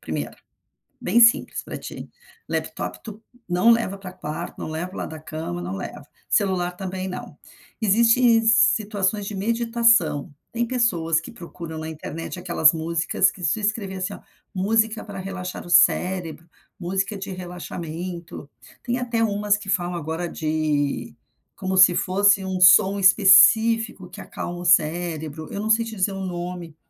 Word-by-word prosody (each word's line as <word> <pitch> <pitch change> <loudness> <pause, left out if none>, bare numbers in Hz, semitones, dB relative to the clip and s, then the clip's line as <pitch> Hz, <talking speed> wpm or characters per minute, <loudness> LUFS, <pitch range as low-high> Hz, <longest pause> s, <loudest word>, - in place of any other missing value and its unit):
primeiro. - - -5 0.7
Bem 235 -1 +2
simples 230 0 +4
para - - -7
ti, - - -9 0.4
laptop - - -4
tu 220 -1 -10 0.3
não 180 +7 +4
leva 230 -4 0
para 195 -2 -9
o - - -17
quarto, 160 +2 -6
não - - -5
leva 160 +3 -4
para 185 - -13
o - - -7
lado - - -5
da 160 -1 -9
cama, 155 - -6
não 90 +2 -5
leva. 140 +9 -8 0.2
Celular 185 -3 +1
também 190 -1 -5
não. 185 - -8 0.4
Existe 230 +2 +4
situações 210 -2 +2
de 210 - -6
meditação. 230 -7 +1 0.2
Tem 235 0 -1
pessoas 175 -11 +1
que 165 - -11
procuram 170 -2 -9
na 160 - -6
internet 160 +3 -7
aquelas 170 -3 +4
músicas, 165 +1 0
que 180 - -13
se 220 - 0
escrever 205 -2 -2
assim, 185 +2 -4
ó: - - -10 0.3
“música 220 +3 0
para 200 -2 -9
relaxar 185 -2 -6
o - - -11
cérebro”, 170 -2 +2 0.3
“música 195 +3 -2
de 195 0 -7
relaxamento”. 175 -3 -7 0.3
Tem 245 -1 -1
até 235 -2 -1
umas 205 -1 +1
que 205 -2 -10
falam 175 -2 -1
agora 165 +1 -4
de 155 -2 -2 0.4
como 190 0 -3
se 185 -2 +7
fosse 200 +1 +3
um 185 -1 -3
som 190 +2 +6
específico 210 +1 +5
que - - -10
acalma 175 0 -7
o 175 - -7
cérebro. 160 -2 0
Eu 200 - -5
não 215 - -3
sei 225 +1 +3
te 225 -1 -7
dizer 195 +1 0
o 195 - -6
nome, 175 -2 -6
185 Hz, 165 wpm, -23 LUFS, 170-210 Hz, 0.7 s, se